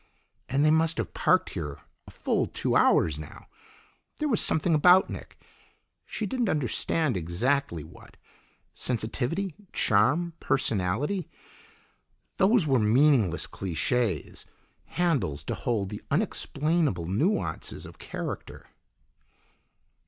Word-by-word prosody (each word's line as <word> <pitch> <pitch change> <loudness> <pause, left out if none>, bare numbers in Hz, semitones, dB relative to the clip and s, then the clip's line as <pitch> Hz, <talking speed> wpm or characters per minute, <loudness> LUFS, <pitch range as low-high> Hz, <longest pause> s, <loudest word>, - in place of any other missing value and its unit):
And 140 +3 +2
they 155 - +5
must 160 +1 +2
have 115 -6 -3
parked - - +2
here 70 -1 -5 0.3
a - - -9
full - - -1
two - - -1
hours 75 -2 +4
now. 75 - -10 0.7
There 305 - -1
was 230 -8 +1
something 160 +2 +1
about 180 +5 +5
Nick - - -9 0.7
she 215 - -3
didn't 240 +1 -1
understand 150 - 0
exactly 90 - -1
what; 80 - -15 0.6
sensitivity, 130 - -2 0.2
charm, 140 +12 +2
personality. 130 - 0 1.1
Those 200 -1 +4
were 135 -4 +3
meaningless 110 - +3
cliches, 95 - -2 0.4
handles 145 - -1
to - - -3
hold 105 -5 -1
the 105 - -7
unexplainable 150 - 0
nuances 150 - -1
of - - -13
character. - - -7
135 Hz, 110 wpm, -27 LUFS, 100-165 Hz, 1.1 s, they